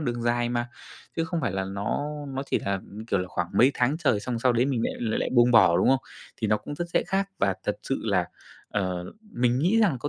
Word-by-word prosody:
đường 120 -5 -2
dài 120 0 +1
mà. 120 0 -1 0.5
Chứ 165 - +1
không 170 -1 -2
phải 120 -9 -1
là 95 0 -1
nó 100 +8 -2 0.2
nó 135 0 -3
chỉ - - +3
là, 100 -1 -2 0.3
kiểu 110 - +1
là, 90 0 -3
khoảng 90 -1 -2
mấy 125 +6 +6
tháng 125 +4 +1
trời 140 -11 +2
xong 120 +2 -3
sau 125 +1 +3
đấy 120 +2 +2
mình 130 -5 0
lại - - -1
l 110 -2 -1
lại - - -1
buông 120 0 +6
bỏ, 95 -8 +6
đúng - - +3
không? 135 0 +4 0.4
Thì 110 - -2
nó 105 0 +3
cũng 105 +8 -7
rất 175 - -3
sẽ - - +2
khác, 195 +2 0
và 100 -1 +2
thật - - -1
sự - - -2
là, - - +2 0.4
ờ, 95 -3 -2 0.3
mình 120 +1 +2
nghĩ 180 +10 +3
rằng 195 -11 +3
có 145 - -3
120 Hz, 255 wpm, -26 LUFS, 105-135 Hz, 0.5 s, mấy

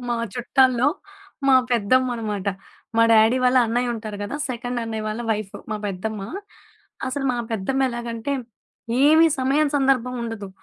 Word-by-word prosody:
మా 240 - 0 0.2
చుట్టాల్లో 255 +1 +3 0.6
మా 265 - +7 0.2
పెద్దమ్మ 245 +3 +3
అనమాట. 210 -3 -3 0.5
మా 230 - +6
డ్యాడీ 220 +3 +5
వాళ్ళ 250 +1 +4
అన్నయ్య 240 +1 0
ఉంటారు 215 -2 -6
కదా! 205 +8 -4
సెకండ్ 245 0 -3
అన్నయ్య 220 -1 -4
వాళ్ళ 215 +2 -4
వైఫు. 215 -2 -3
మా 215 - -1
పెద్దమ్మ. 205 +2 -4 0.9
అసలు 270 +1 -3
మా - - -2 0.2
పెద్దమ్మెలాగంటే, 240 +2 -2 0.7
ఏమి 315 +2 +6
సమయం 280 +3 +2
సందర్భం 260 -2 +1
ఉండదు. 225 -4 -5
240 Hz, 135 wpm, -23 LUFS, 220-260 Hz, 0.9 s, మా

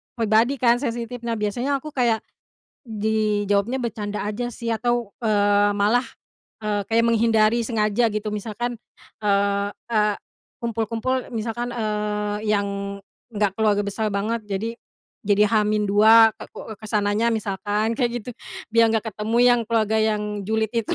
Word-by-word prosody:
pribadi 230 +4 +2
kan, 235 -1 +4
sensitif. 240 -1 -4
Nah, 230 -1 -1
biasanya 245 +7 -1
aku 305 - -10
kayak 235 -4 +2 0.7
dijawabnya 215 +1 0
bercanda 210 -3 -4
aja 240 +3 -3
sih, 235 0 -6
atau, 240 0 0 0.2
eee, 205 -1 +3
malah, 230 +5 +3 0.6
eee, 210 -1 -1
kayak 230 +1 +3
menghindari 230 0 +3
sengaja 220 0 +1
gitu. 215 0 -3
Misalkan, 225 +3 -4 0.5
eee 200 0 +2 0.2
eee, 210 -2 +2 0.5
kumpul-kumpul 230 +3 -2
misalkan, 235 +2 -3
eee, 210 -2 -2 0.2
yang 200 -1 -2 0.3
enggak 205 -2 +1
keluarga 210 -2 +2
besar 210 +1 -2
banget, 215 +3 -2
jadi 205 +2 -3 0.5
jadi 205 0 +3
H-2, 215 +1 +5
ka - - -9
ko - - -8
eee, - - -10
ke - - -12
sananya 210 +2 +1
misalkan, 210 +1 -1
kayak 240 -1 0
gitu. 235 - -8 0.4
Biar 230 0 +4
nggak 225 0 0
ketemu 215 +2 -3
yang 245 -1 +5
keluarga 220 -1 +1
yang 210 -2 -1
julid 220 +2 0
itu. 230 -2 -1
220 Hz, 140 wpm, -23 LUFS, 210-230 Hz, 0.7 s, H-2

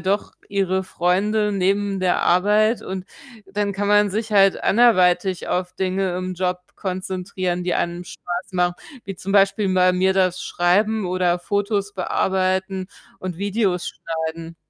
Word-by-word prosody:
doch 195 +4 -1 0.2
ihre 190 -1 0
Freunde 210 +5 +1
neben 195 +1 0
der 185 -1 +2
Arbeit, 210 +5 +3
und 190 -1 -6 0.4
dann 200 +1 -2
kann 200 +1 -2
man 205 -1 +4
sich 220 +2 -3
halt 195 -2 +4
anderweitig 190 -5 +3
auf 180 0 -1
Dinge 185 0 -1
im 185 0 -4
Job 180 0 -1 0.2
konzentrieren, 185 -1 -3
die 180 - 0
einem 175 +1 -2
Spaß 175 +1 -6
machen, 180 -1 +1 0.3
wie 195 - -6
zum 195 +2 -5
Beispiel 195 0 +3
bei 185 0 +4
mir 190 +1 +2
das 185 -2 +1
Schreiben 205 +4 +1
oder 180 -1 +1
Fotos 200 +2 -1
bearbeiten 190 0 -1 0.3
und 185 -2 -6
Videos 200 -3 0
schneiden. 165 0 -5
190 Hz, 145 wpm, -22 LUFS, 180-200 Hz, 0.4 s, man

